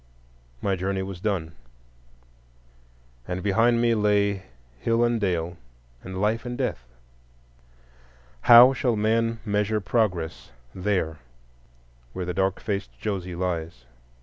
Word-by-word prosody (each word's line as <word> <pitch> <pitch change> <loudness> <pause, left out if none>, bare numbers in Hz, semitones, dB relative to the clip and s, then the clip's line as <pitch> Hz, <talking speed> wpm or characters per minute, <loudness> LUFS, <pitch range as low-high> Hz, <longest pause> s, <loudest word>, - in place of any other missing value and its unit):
My 100 -1 +1
journey 95 +1 -2
was 95 -2 -7
done, 90 -5 -2 1.7
and 90 0 -4
behind 115 +4 +3
me 120 0 +3
lay 100 -2 +1 0.3
hill 115 - +1
and 120 -1 +1
dale, 85 -3 -1 0.4
and 95 0 -7
Life 110 +3 0
and 120 -1 -5
Death. 95 - -3 1.6
How 120 +2 +10
shall 125 -3 0
man 115 +2 +1
measure 105 0 0
Progress 90 -4 -1 0.2
there 90 -5 -1 0.9
where 90 - -4
the 90 - -3
dark 95 +1 0
faced 100 -2 -3
Josie 95 -4 -3
lies? 85 -7 -4
100 Hz, 115 wpm, -25 LUFS, 90-115 Hz, 1.7 s, How